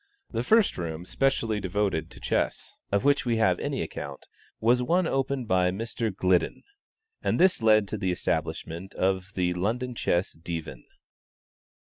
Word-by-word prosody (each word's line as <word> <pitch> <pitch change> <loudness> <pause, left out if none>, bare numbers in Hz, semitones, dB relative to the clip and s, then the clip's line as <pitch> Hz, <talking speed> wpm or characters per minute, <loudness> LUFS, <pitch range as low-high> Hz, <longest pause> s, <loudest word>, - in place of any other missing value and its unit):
The 115 - -1
first 220 - +3
room 85 0 -4
specially 115 -3 +1
devoted 95 -4 -1
to - - -13
chess, - - -1 0.2
of 100 0 +2
which 140 -2 +3
we 120 -2 +1
have 95 -5 +3
any - - -2
account, - - -7 0.3
was 120 +3 +3
one 175 +8 +2
opened 135 -4 -1
by 90 -2 +3
Mr. 115 +4 -2
Gliddon, 90 -2 +1 0.6
and - - 0
this 185 -6 +4
led 110 -2 +5
to 110 - -3
the 95 -2 0
establishment 90 0 -3
of 95 0 0
the 90 -1 +1
London 115 +8 -1
Chess 90 -5 0
Divan. 80 -6 -6
100 Hz, 150 wpm, -27 LUFS, 90-125 Hz, 0.6 s, led